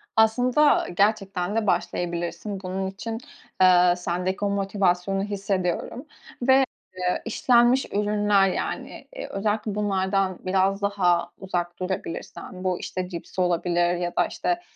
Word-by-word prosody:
Aslında 245 +6 +4
gerçekten 200 -2 +1
de 225 -2 0
başlayabilirsin. 175 +2 -2
Bunun 190 +1 -3
için, 215 +4 -5 0.4
eee, 180 -1 +6
sendeki 180 +3 -2
o - - +1
motivasyonu 195 -1 0
hissediyorum. 200 - -2 0.4
Ve, 265 +2 +5 0.3
eee, 180 0 -1
işlenmiş 240 +2 +3
ürünler, 205 -1 +3
yani, - - -4
eee, - - -5
özellikle 210 +1 -1
bunlardan 195 -2 0
biraz 190 +1 +1
daha 195 -4 +1
uzak 175 -2 -3
durabilirsen, 185 0 -5
bu, 185 -1 0
işte, 185 -1 -4
cips 175 +1 -7
olabilir 175 0 +1
ya 175 0 -3
da, - - +3
işte, 350 -1 -2
195 Hz, 120 wpm, -25 LUFS, 180-210 Hz, 0.4 s, eee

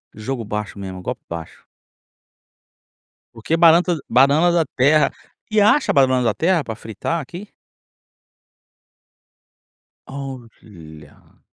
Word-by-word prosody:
jogo 115 +2 -5
baixo 105 -1 -5
mesmo, 95 -2 -7
golpe - - -6
baixo. 85 -1 -9 1.7
Porque 115 +8 -2
banana- 170 +1 +4
banana 140 +8 +4
da 170 -1 +2
terra 150 +4 +3 0.4
e 215 -1 +3
acha 220 +8 +3
a - - -2
banana 130 -2 +3
da 115 -3 +1
terra 170 -2 +1
pra 110 - -6
fritar 115 - -4
aqui? 175 +9 -10 2.6
Olha. 110 - -12
130 Hz, 105 wpm, -20 LUFS, 105-165 Hz, 2.6 s, banana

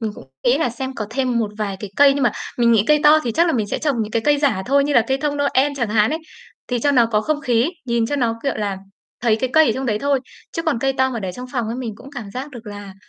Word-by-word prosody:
Mình 220 -2 -3
cũng - - -12 0.2
nghĩ 245 +3 +3
là 310 - +1
xem 260 +3 -5
có 215 -4 -4
thêm 250 0 0
một 220 -3 -1
vài 200 -3 -2
cái 205 -3 -6
cây. 280 -1 +6
Nhưng 280 - -1
mà 235 - +3 0.3
mình 235 -1 +4
nghĩ 220 -2 +4
cây 300 0 +4
to 300 +1 +7
thì 235 - -1
chắc 340 +7 +3
là 335 - +1
mình 220 -6 0
sẽ - - -3
trồng 290 -4 0
những 215 - -5
cái 225 0 0
cây 295 -1 +3
giả 275 -10 +1
thôi 280 +1 +3
như 290 - -1
là 240 - +5
cây 265 0 +1
thông 295 -1 -1
Noel 285 0 +2
chẳng 235 -4 -1
hạn 210 0 +3
ấy, 315 - -1 0.5
thì 245 -1 0
cho 285 +5 +2
nó 240 -4 +4
có 215 -2 +1
không 295 +5 -1
khí, 245 +3 +1 0.2
nhìn 235 -2 +1
cho 290 - -2
nó, 235 -4 +1
kiểu 275 - -1
là, 200 -2 -2 0.4
thấy 230 -2 +2
cái 255 +3 -2
cây 315 +1 +6
ở 230 - +2
trong 265 0 -3
đấy 215 -3 0
thôi. 280 0 +1 0.3
Chứ 330 - -3
còn 305 -8 0
cây 270 +2 +1
to 260 0 +1
mà 235 -3 -4
để 185 -2 -4
trong 250 +6 -8
phòng 245 -4 -1
ấy, 230 +2 -4
mình 235 -4 -5
cũng 270 - -13
cảm 225 -6 -7
giác 260 +6 -6
được 240 -4 -11
là 205 -2 -8
245 Hz, 315 wpm, -20 LUFS, 220-280 Hz, 0.5 s, to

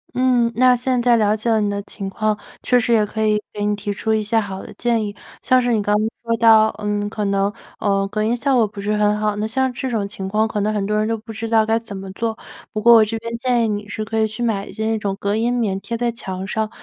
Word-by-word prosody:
嗯， 250 -2 +2
那 250 +1 +5
现 250 0 0
在 240 -1 +4
了 210 -1 +2
解 220 +2 -2
了 220 - +3
你 210 - +1
的 200 0 -3
情 200 -1 -6
况， 215 +1 -1 0.2
确 250 -1 +3
实 235 -1 +1
也 220 - +4
可 220 +1 -2
以 210 0 +2
给 205 0 -3
你 210 0 +1
提 205 0 -4
出 220 +2 -1
一 220 - +1
些 220 +2 +1
好 195 -3 -5
的 - - -10
建 235 -2 +1
议， 205 -1 -5 0.3
像 255 - +4
是 245 -1 +1
你 215 - +2
刚 205 +1 +1
刚 215 +1 0 0.2
说 230 0 0
到， 220 -1 +6 0.2
嗯， 205 0 -1
可 210 -1 -3
能， 200 0 +1 0.3
呃， 195 -1 +1
隔 215 +2 -2
音 230 +2 +1
效 265 +2 +1
果 225 -3 +3
不 205 0 -11
是 210 +1 -1
很 210 0 +2
好， 210 -1 0
那 215 - -1
像 260 +2 0
这 260 - -4
种 215 -4 -1
情 195 -2 -6
况 215 +2 +2
可 215 -1 -3
能 210 +1 +1
很 205 -2 -1
多 210 +1 -1
人 215 - 0
都 225 0 -1
不 225 +1 -10
知 225 +1 -5
道 220 -1 +4
该 225 +1 +1
怎 205 -3 -8
么 190 0 -7
做。 225 +3 -3 0.3
不 215 - -3
过 235 +2 +7
我 225 -1 +8
这 225 +1 -2
边 230 +1 -5
建 245 -2 +1
议 225 - +1
你 205 0 -3
是 215 0 -4
可 220 +1 -2
以 220 - +3
去 220 +3 -5
买 210 -3 -1
一 - - -9
些 220 +2 -4
那 220 0 0
种 200 -2 -3
隔 200 +1 0
音 230 +2 +1
棉 205 -6 -1
贴 235 - -4
在 240 0 0
墙 190 -5 -5
上， 215 +2 -2
215 Hz, 315 characters per minute, -20 LUFS, 205-230 Hz, 0.3 s, 我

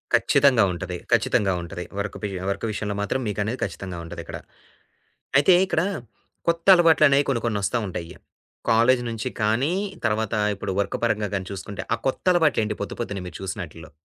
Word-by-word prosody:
ఖచ్చితంగా 140 -4 +4
ఉంటది. 90 0 -5
ఖచ్చితంగా 95 -2 +3
ఉంటది. 90 +1 -6 0.2
వర్క్ 100 0 -3
బీయా 95 -3 -3
వర్క్ 100 - -2
విషయంలో 105 -1 -3
మాత్రం 105 +6 -1
మీకనేది 105 +4 -2
ఖచ్చితంగా 95 -3 -5
ఉంటదిక్కడ. 85 - -7 1.0
అయితే 145 +6 +6
ఇక్కడ 165 -3 +1 0.7
కొత్త 170 0 0
అలవాట్లనేయి 155 -5 +5
కొన్ని, 130 -4 +1
కొన్నొస్తా 105 +1 0
ఉంటయ్యి. 85 -2 -6 0.5
కాలేజీ 120 +3 +4
నుంచి 115 +2 -3
కానీ, 115 +10 +2 0.3
తర్వాత 110 -1 0 0.2
ఇప్పుడు 95 - -3
వర్క్ 100 - -1
పరంగా 110 -3 +1
గాని 95 -1 -2
చూసుకుంటే, 100 +1 -6
ఆ - - -1
కొత్తలవాట్లేంటి 150 - +2
పొద్దు 100 - -4
పొద్దున్నే 100 -5 -3
మీరు 90 - -8
చూసినా‌టి‌ల్లో? 85 -5 -6
105 Hz, 145 wpm, -24 LUFS, 95-130 Hz, 1.0 s, అయితే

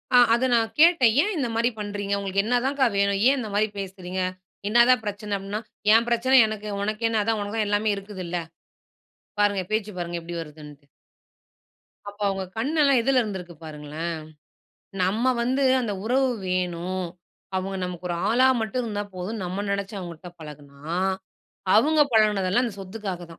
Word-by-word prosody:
ஆ - - +9 0.2
அத 240 +2 +2
நான் 225 -1 +2
கேட்டேன். 320 -9 +6
ஏன் 420 - -1
இந்த 265 - 0
மாரி 235 +1 +2
பண்றீங்க? 205 -1 -3
உங்களுக்கு 200 0 0
என்ன 245 +2 +2
தான்கா 275 0 +2
வேணும்? 200 0 +2
ஏன் 275 +1 +4
இந்த 220 -4 -4
மாதிரி 215 +1 +3
பேசுறீங்க? 185 -1 -5 0.5
என்னதான் 240 +1 +5
பிரச்சன? 205 0 -3
அப்டீன்னா, 200 +2 -5 0.3
ஏன் 230 +1 +4
பிரச்சன 260 +3 +4
எனக்கு, 215 -1 -6
உனக்கு 215 +2 -2
என்ன? 220 -2 +1
அதான் 225 0 0
உனக்கு 205 +2 -4
தான் 215 - +1
எல்லாமே 205 +1 +1
இருக்குதுல்ல! 190 -3 -5 1.0
பாருங்க, 205 -2 +2
பேச்சு 215 -1 -1
பாருங்க 175 0 -3
எப்டி 170 +1 -6
வருதுன்ட்டு? 150 -2 -12 1.2
அப்ப 205 +1 -15
அவங்க 195 -1 -1
கண்ணெல்லாம் 280 +1 +3
எதுல 260 +2 +3
இருந்திருக்கு 190 -6 -6
பாருங்களேன்! 155 +2 -5 0.9
நம்ப 210 +7 +1
வந்து 260 +3 +1 0.2
அந்த 210 -4 -2
உறவு 260 +3 +2 0.2
வேணும். 180 0 -2 0.5
அவங்க 190 +1 -3
நமக்கு 180 0 -5
ஒரு 175 - -1
ஆளா 250 +3 +5
மட்டும் 225 +3 -2
இருந்தா 210 -3 -3
போதும், 195 +4 -4
நம்ப 185 +3 -3
நினைச்சு 200 +1 -3
அவங்கள்ட்ட 175 0 -8
பழகுனா, 145 -2 -12 0.9
அவுங்க 300 +8 +4
பழகுனதெல்லாம் 210 +1 +3
அந்த 225 -5 -5
சொத்துக்காக 195 -1 -5
தான். 165 - -13
205 Hz, 155 wpm, -25 LUFS, 185-230 Hz, 1.2 s, ஆ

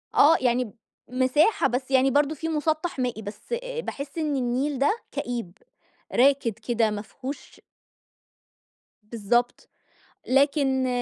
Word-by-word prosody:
آه 320 +3 +6
يعني 250 0 +2
ب 215 - -12 0.4
مساحة 260 - +3
بس 260 +2 -3
يعني 265 0 +4
برضه 290 +3 +2
في 325 +3 -4
مُسَطح 310 0 -1
مائي، 245 -3 -2
بس 210 - -8 0.3
باحس 280 - -6
إن 305 -3 0
النيل 260 +2 -1
ده 290 - +2
كئيب، 230 -7 -4 0.6
راكد 270 -2 +3
كده 230 +1 0
ما 205 -1 -4
فيهوش 270 +5 -9 1.4
بالضبط، 235 +3 -1 0.6
لكن 270 -1 +2
260 Hz, 120 wpm, -25 LUFS, 240-290 Hz, 1.4 s, آه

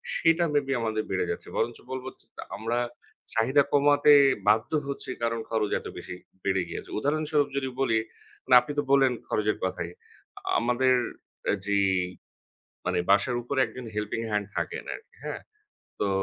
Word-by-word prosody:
সেটা 165 +1 +3
মেবি 145 -2 +1
আমাদের 110 -1 -1
বেড়ে - - 0
যাচ্ছে। - - -6
বরঞ্চ 115 +1 0
বলবো 130 0 -4
যে - - -18 0.3
আমরা 115 +2 -1 0.6
চাহিদা 130 +6 +4
কমাতে 145 +1 +6 0.3
বাধ্য 110 +1 +3 0.2
হচ্ছি 140 - -4
কারণ 115 0 0
খরচ 110 -2 0
এত - - -9
বেশি - - -7 0.3
বেড়ে 95 -1 +1
গিয়েছে। - - -6
উদাহরণস্বরূপ 150 +2 +1
যদি 135 -1 0
বলি, 115 -4 +3 0.5
মানে 125 - +5
আপনি 150 - -6
তো - - +1
বললেন 135 -2 +5
খরচের 105 0 0
কথাই। 90 -2 -2 0.7
আমাদের 125 +2 +3 0.5
অ্যা - - +2
যেই, 100 -1 +3 1.0
মানে 90 0 +1
বাসার 100 +5 +4
উপরে 135 +3 -1
একজন 120 +2 -9
helping 105 +2 -2
hand 105 -1 0
থাকেন - - -2
আরকি 445 - -12
হ্যাঁ। - - -4 0.6
তো 100 - +2
120 Hz, 150 wpm, -27 LUFS, 105-140 Hz, 1.0 s, কমাতে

